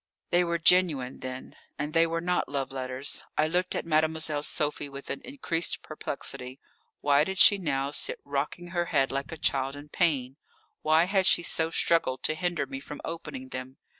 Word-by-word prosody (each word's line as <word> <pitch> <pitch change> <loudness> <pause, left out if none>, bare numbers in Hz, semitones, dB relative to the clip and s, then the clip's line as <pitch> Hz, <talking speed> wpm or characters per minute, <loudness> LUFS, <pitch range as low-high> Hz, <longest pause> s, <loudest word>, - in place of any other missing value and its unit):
They 175 +1 +4
were 170 -1 0
genuine, 160 -7 +3
then. 130 0 -7 0.2
And 150 +1 -3
they 165 0 +5
were 165 0 -2
not 180 +1 0
love 135 -2 -2
letters. 130 +1 -3
I 155 - +3
looked 180 +3 0
at - - -2
Mademoiselle 155 -1 +1
Sophie 150 -1 -1
with 140 0 -7
an - - -4
increased 185 -11 -2
perplexity. 125 +1 -4 0.4
Why 145 0 +4
did 190 +4 -4
she 205 +2 +7
now 140 -5 -1
sit - - +1
rocking 145 +5 -3
her 175 0 0
head 135 -5 +1
like 135 0 -3
a 165 - -6
child 135 -2 0
in 145 +1 -10
pain? 140 -6 +1 0.4
Why 155 +1 +4
had 190 +1 +2
she 175 - +5
so 165 -1 0
struggled 165 -5 +2
to - - +2
hinder 170 -3 -1
me 135 0 -6
from 145 +2 -9
opening 150 -6 -6
them? 130 +1 -7
150 Hz, 185 wpm, -28 LUFS, 135-170 Hz, 0.4 s, she